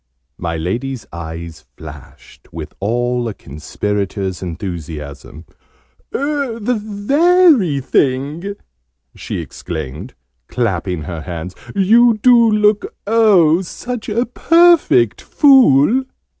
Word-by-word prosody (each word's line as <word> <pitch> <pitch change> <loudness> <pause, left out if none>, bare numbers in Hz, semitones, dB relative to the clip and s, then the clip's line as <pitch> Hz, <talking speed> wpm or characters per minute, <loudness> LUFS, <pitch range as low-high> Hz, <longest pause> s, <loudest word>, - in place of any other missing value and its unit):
My 85 -1 -3
Lady's 120 +10 -4
eyes 80 0 -8
flashed - - -14
with 80 -1 -8
all 120 +3 -1
a 110 - -5
Conspirator's 95 +6 -4
enthusiasm. 80 -4 -7 0.7
"The 250 -6 -2
very 265 - +3
thing!" 145 +9 -1 0.6
she - - -6
exclaimed, 80 - -7 0.3
clapping 90 -8 -2
her 80 +1 -6
hands. 85 +1 -7 0.2
"You 225 +4 +4
do 235 0 +5
look, 210 -1 +1
oh, 200 -7 +4
such 240 +6 -6
a 230 +4 0
perfect 330 - +3
Fool!" 260 - +4
135 Hz, 90 wpm, -17 LUFS, -, 0.7 s, do